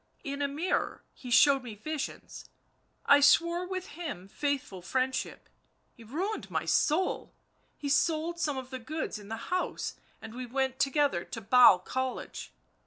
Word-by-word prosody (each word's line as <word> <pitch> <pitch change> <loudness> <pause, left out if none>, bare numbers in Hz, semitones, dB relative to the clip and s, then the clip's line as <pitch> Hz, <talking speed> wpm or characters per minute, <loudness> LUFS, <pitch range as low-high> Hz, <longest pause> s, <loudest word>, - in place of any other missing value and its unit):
in 280 0 -4
a 285 - +2
mirror 305 +6 -2
he 250 - -10
showed 275 +3 +6
me 235 -4 -8
visions, 305 +7 -6 0.6
I 285 - +7
swore 340 +5 +4
with 370 0 -5
him 290 - -6
faithful 270 -6 -3
friend 260 +8 0
ship.. - - -5 0.5
.he 235 - -15
ruined 360 - -3
my - - -2
soul 340 +5 +1 0.2
— - - -40
he 290 - -5
sold 320 +3 +1
some 295 -5 0
of 260 0 -7
the 260 - -5
goods 305 -3 -4
in 205 - -12
the 225 +1 -4 0.2
house, 365 - -2 0.3
and 220 0 -10
we 250 +1 -6
went 265 +1 -1
together 275 - +2
to 230 - -6
Basle 225 -2 +7
College. 260 +8 -4
275 Hz, 165 wpm, -30 LUFS, 245-310 Hz, 0.6 s, I